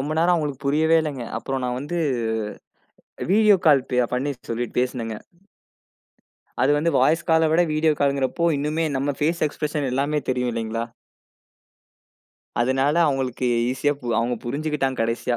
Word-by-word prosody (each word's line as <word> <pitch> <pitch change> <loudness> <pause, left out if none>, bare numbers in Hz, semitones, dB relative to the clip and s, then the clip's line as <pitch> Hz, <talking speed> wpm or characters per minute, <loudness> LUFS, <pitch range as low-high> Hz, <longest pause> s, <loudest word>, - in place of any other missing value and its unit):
ரொம்ப 145 +3 -2
நேரம் 170 +2 +4
அவங்களுக்கு 145 -4 -3
புரியவே 160 +3 +3
இல்லைங்க. 140 -6 -4
அப்புறம் 135 -1 -3
நான் 125 0 -2
வந்து 170 +5 -3 1.3
வீடியோ 210 0 +5
கால் 140 -4 +4
பே 125 - +2
பண்ணி 140 +3 -1 0.2
சொல்லி 120 +1 -2
பேசினேங்க. 120 -3 -2 1.5
அது 135 - +4
வந்து 165 +3 +1
வாய்ஸ் 165 +3 +3
கால 160 0 +4
விட, 165 - +4
வீடியோ 155 0 +3
காலுங்கிறப்போ 140 +3 +1
இன்னுமே 155 +3 -1
நம்ம 140 +1 -1
பேஸ் 165 +2 +1
எக்ஸ்பிரஷன் 150 -1 -3
எல்லாமே 145 +3 0
தெரியும் 125 -1 0
இல்லைங்களா? 115 0 -3 1.8
அதனால 135 +4 +2
அவங்களுக்கு 130 -3 -1 0.2
ஈசியா 135 +3 +1 0.3
அவங்க 120 +1 0
புரிஞ்சுக்கிட்டாங்க 140 0 -2
கடைசியா. 115 +1 -1
140 Hz, 135 wpm, -23 LUFS, 125-155 Hz, 1.8 s, வீடியோ